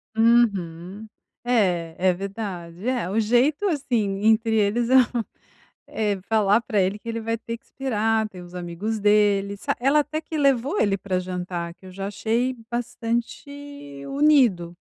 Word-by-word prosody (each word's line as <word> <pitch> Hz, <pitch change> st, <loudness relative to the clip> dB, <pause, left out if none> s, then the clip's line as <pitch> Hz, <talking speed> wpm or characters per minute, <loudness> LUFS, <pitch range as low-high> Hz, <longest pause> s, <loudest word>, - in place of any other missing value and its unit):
Uhum. 205 Hz, -4 st, +1 dB, 0.4 s
É 180 Hz, -9 st, +1 dB
é 185 Hz, 0 st, +3 dB
verdade. 190 Hz, -1 st, -6 dB
É 250 Hz, -8 st, -1 dB
o 210 Hz, +4 st, 0 dB
jeito, 245 Hz, -, +2 dB
assim, 225 Hz, -, -1 dB
entre 225 Hz, 0 st, +3 dB
eles 220 Hz, +3 st, +1 dB
é, 260 Hz, -, +4 dB
hã, 245 Hz, -3 st, +3 dB, 0.6 s
é 210 Hz, -3 st, -2 dB
falar 210 Hz, +1 st, +3 dB
pra 215 Hz, -2 st, 0 dB
ele 190 Hz, +2 st, 0 dB
que 230 Hz, -, -11 dB
ele 230 Hz, 0 st, -3 dB
vai 225 Hz, +1 st, -2 dB
ter 230 Hz, +1 st, -6 dB
que -, -, -28 dB
esperar, 225 Hz, -4 st, -1 dB
ter 180 Hz, -3 st, -11 dB
os 175 Hz, 0 st, -13 dB
amigos 180 Hz, +5 st, -4 dB
dele, 205 Hz, -1 st, +2 dB
sa -, -, -2 dB
ela 275 Hz, +4 st, +4 dB
até 310 Hz, +1 st, -3 dB
que 320 Hz, -, -6 dB
levou 275 Hz, -, +2 dB
ele 200 Hz, -1 st, +2 dB
pra 185 Hz, -1 st, -2 dB
jantar, 180 Hz, -2 st, -4 dB
que 190 Hz, -, -17 dB
eu -, -, -10 dB
já 195 Hz, +1 st, -5 dB
achei 235 Hz, +5 st, -1 dB
bastante 240 Hz, -, -5 dB
unido. 255 Hz, -, +3 dB
220 Hz, 160 wpm, -24 LUFS, 190-240 Hz, 0.6 s, é